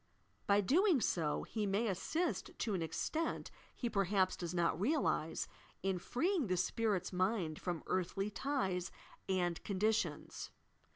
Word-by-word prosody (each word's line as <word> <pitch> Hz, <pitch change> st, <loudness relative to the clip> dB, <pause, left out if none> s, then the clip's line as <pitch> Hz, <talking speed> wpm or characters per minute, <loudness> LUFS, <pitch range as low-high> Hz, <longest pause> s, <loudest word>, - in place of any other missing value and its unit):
By 200 Hz, 0 st, +5 dB
doing 330 Hz, -, +4 dB
so 160 Hz, -9 st, +1 dB
he 215 Hz, -2 st, -2 dB
may 200 Hz, +4 st, +1 dB
assist 315 Hz, -, -1 dB
to 220 Hz, -, -1 dB
an 185 Hz, -, 0 dB
extent 165 Hz, -, -2 dB, 0.2 s
he 245 Hz, -, -2 dB
perhaps 195 Hz, -3 st, +2 dB
does 175 Hz, -2 st, -4 dB
not 175 Hz, 0 st, +1 dB
realize 220 Hz, -, +1 dB, 0.4 s
in 190 Hz, -1 st, +1 dB
freeing 325 Hz, -, +1 dB
the 185 Hz, -1 st, +1 dB
spirit's 195 Hz, 0 st, 0 dB
mind 185 Hz, -4 st, 0 dB
from 175 Hz, -3 st, -2 dB
earthly 195 Hz, +3 st, -1 dB
ties 195 Hz, -9 st, -1 dB, 0.4 s
and 175 Hz, -3 st, +1 dB
conditions. 210 Hz, +2 st, 0 dB
195 Hz, 130 wpm, -36 LUFS, 180-230 Hz, 0.4 s, By